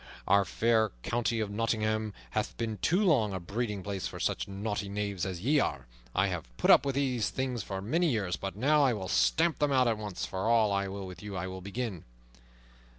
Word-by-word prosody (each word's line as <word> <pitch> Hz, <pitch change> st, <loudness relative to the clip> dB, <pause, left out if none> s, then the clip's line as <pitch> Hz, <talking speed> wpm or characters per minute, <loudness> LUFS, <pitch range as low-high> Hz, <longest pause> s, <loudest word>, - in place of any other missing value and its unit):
Our 100 Hz, 0 st, +5 dB
fair 110 Hz, -2 st, +2 dB
county 120 Hz, -1 st, 0 dB
of 105 Hz, -2 st, -2 dB
Nottingham 110 Hz, -1 st, -1 dB, 0.2 s
hath -, -, -2 dB
been 110 Hz, -3 st, -3 dB
too 180 Hz, -, +2 dB
long 125 Hz, -, +3 dB
a -, -, -2 dB
breeding 105 Hz, +2 st, -3 dB
place 100 Hz, -2 st, -3 dB
for -, -, -8 dB
such -, -, -1 dB
naughty 100 Hz, +1 st, -3 dB
knaves 100 Hz, -2 st, -2 dB
as 90 Hz, -2 st, -5 dB
ye 145 Hz, +7 st, +3 dB
are. 70 Hz, -, -1 dB, 0.3 s
I -, -, +4 dB
have -, -, -3 dB
put -, -, +4 dB
up -, -, +6 dB
with 135 Hz, -, -1 dB
these 130 Hz, -5 st, +1 dB
things 130 Hz, -3 st, -2 dB
for 95 Hz, 0 st, -5 dB
many 165 Hz, -, +2 dB
years, 100 Hz, -8 st, 0 dB
but 95 Hz, 0 st, -5 dB
now 145 Hz, +7 st, +3 dB
I 130 Hz, -3 st, +4 dB
will 95 Hz, -4 st, -4 dB
stamp 165 Hz, -, +2 dB
them 145 Hz, -1 st, +2 dB
out 125 Hz, -4 st, +3 dB
once 105 Hz, -3 st, -5 dB
for 95 Hz, +4 st, -2 dB
all, 110 Hz, -4 st, +4 dB
and 100 Hz, -1 st, -1 dB
with 90 Hz, -1 st, -9 dB
you 105 Hz, -2 st, -6 dB
I 90 Hz, -, -2 dB
will 95 Hz, 0 st, -6 dB
begin." 100 Hz, -2 st, -4 dB
110 Hz, 210 wpm, -30 LUFS, 100-120 Hz, 0.3 s, up